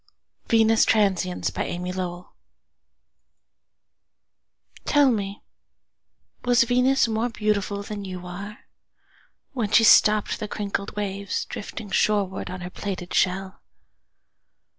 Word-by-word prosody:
Venus 225 Hz, -1 st, +4 dB
Transiens 190 Hz, -4 st, +1 dB
By -, -, -2 dB
Amy 180 Hz, +1 st, -4 dB
Lowell 180 Hz, -1 st, -6 dB, 2.5 s
TELL 290 Hz, -3 st, +4 dB
me, 200 Hz, -3 st, -3 dB, 1.0 s
Was 245 Hz, 0 st, +4 dB
Venus 250 Hz, +2 st, +3 dB
more 225 Hz, +2 st, -1 dB
beautifulThan 205 Hz, -1 st, -2 dB
you 185 Hz, -2 st, -7 dB
are, 200 Hz, +4 st, -8 dB, 0.9 s
When 235 Hz, -6 st, -2 dB
she 225 Hz, +2 st, +5 dB
stoppedThe 215 Hz, 0 st, +4 dB
crinkled 200 Hz, -1 st, -4 dB
waves, 200 Hz, -1 st, -3 dB
Drifting 205 Hz, 0 st, -7 dB
shorewardOn 190 Hz, -3 st, 0 dB
her 180 Hz, -, -7 dB
plaited 185 Hz, -3 st, -5 dB
shell? 190 Hz, +1 st, 0 dB
205 Hz, 95 wpm, -24 LUFS, 190-220 Hz, 2.5 s, she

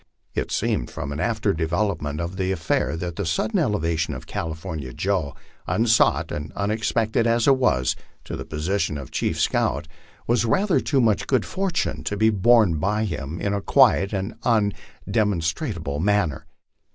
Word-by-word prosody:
It -, -, -2 dB
seemed, -, -, 0 dB
from 70 Hz, -, -5 dB
an 70 Hz, -, -4 dB
after 110 Hz, 0 st, 0 dB
development 80 Hz, -2 st, -1 dB
of 85 Hz, +2 st, -4 dB
the 95 Hz, 0 st, -1 dB
affair, 80 Hz, -2 st, 0 dB
that 85 Hz, 0 st, -5 dB
the 100 Hz, -, -1 dB
sudden 85 Hz, +5 st, 0 dB
elevation 80 Hz, -6 st, 0 dB
of 65 Hz, -, -8 dB
California 80 Hz, -5 st, -5 dB
Joe, 90 Hz, -7 st, -1 dB, 0.3 s
unsought 115 Hz, 0 st, +3 dB
and 75 Hz, +1 st, -5 dB
unexpected 110 Hz, +2 st, 0 dB
as 115 Hz, 0 st, +2 dB
it 135 Hz, -, +7 dB
was, 65 Hz, -, +2 dB, 0.3 s
to -, -, -6 dB
the -, -, -5 dB
position 80 Hz, +1 st, -1 dB
of 70 Hz, -, -8 dB
chief -, -, -1 dB
scout, 70 Hz, +4 st, +1 dB, 0.4 s
was 120 Hz, -1 st, +2 dB
rather 190 Hz, -, +2 dB
too 135 Hz, -3 st, +1 dB
much 110 Hz, -4 st, +2 dB
good 130 Hz, -5 st, +2 dB
fortune 190 Hz, -3 st, -2 dB
to 100 Hz, -, -2 dB
be 110 Hz, +2 st, +4 dB
borne 105 Hz, -5 st, +4 dB
by 105 Hz, +6 st, 0 dB
him 80 Hz, -3 st, -4 dB
in 100 Hz, -, -1 dB
a 100 Hz, -, -1 dB
quiet 115 Hz, -5 st, +4 dB
or 100 Hz, +2 st, -3 dB
undemonstrative 105 Hz, -, -1 dB
manner. 100 Hz, -7 st, +1 dB
100 Hz, 160 wpm, -23 LUFS, 80-110 Hz, 0.4 s, it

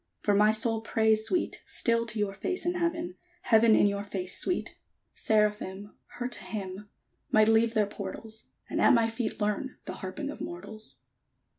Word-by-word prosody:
For 205 Hz, -, +2 dB
my 210 Hz, +1 st, +5 dB
soul 220 Hz, +1 st, +3 dB
prays, 220 Hz, -1 st, +2 dB
Sweet, 360 Hz, -, -1 dB
Still 230 Hz, 0 st, +1 dB
to 220 Hz, -, -2 dB
your 205 Hz, -2 st, -1 dB
face 365 Hz, -, -1 dB
in 350 Hz, -, +1 dB
Heaven, 340 Hz, 0 st, -2 dB, 0.3 s
Heaven 225 Hz, -1 st, +5 dB
in -, -, +4 dB
your 200 Hz, 0 st, 0 dB
face, 185 Hz, -2 st, -1 dB
Sweet! 360 Hz, -, +1 dB, 0.4 s
_Seraphim, 210 Hz, -2 st, 0 dB, 0.2 s
Her 245 Hz, 0 st, -2 dB
to 250 Hz, -, -2 dB
hymn, 200 Hz, -1 st, -7 dB, 0.4 s
Might 215 Hz, 0 st, +5 dB
leave 225 Hz, +1 st, +3 dB
their 215 Hz, -1 st, +3 dB
portals; 210 Hz, +2 st, -6 dB, 0.2 s
And -, -, -2 dB
at -, -, +6 dB
my 230 Hz, -1 st, +3 dB
feet 225 Hz, 0 st, -4 dB
learn 210 Hz, +5 st, -2 dB
The -, -, -5 dB
harping 275 Hz, +10 st, -5 dB
of -, -, -10 dB
mortals! 205 Hz, +5 st, -7 dB
220 Hz, 170 wpm, -28 LUFS, 205-230 Hz, 0.4 s, at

